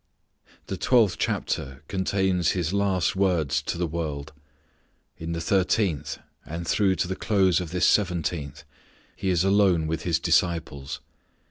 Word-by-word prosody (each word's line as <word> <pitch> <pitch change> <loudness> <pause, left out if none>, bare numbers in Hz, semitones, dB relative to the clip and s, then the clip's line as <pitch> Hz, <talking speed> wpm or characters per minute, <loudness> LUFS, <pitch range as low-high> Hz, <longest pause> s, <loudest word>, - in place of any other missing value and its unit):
The 95 - -4
twelfth 115 -7 +3
chapter 65 +2 -2
contains 95 -2 +1
His 90 -1 -1
last 100 -3 +1
words 90 -8 +1
to - - -4
the 90 - 0
world. 80 -3 -4 0.9
In 80 +1 -4
the 85 - -3
thirteenth 95 -1 0 0.3
and 85 +3 -6
through 95 -1 +2
to 85 - -1
the 95 - -3
close 95 -5 +2
of 90 - -5
this 90 +2 +1
seventeenth 85 -6 0 0.5
He 95 - -2
is 90 -1 +2
alone 95 -4 +3
with 80 +1 -2
His 85 -2 +1
disciples. 80 -6 0
90 Hz, 140 wpm, -25 LUFS, 80-95 Hz, 0.9 s, twelfth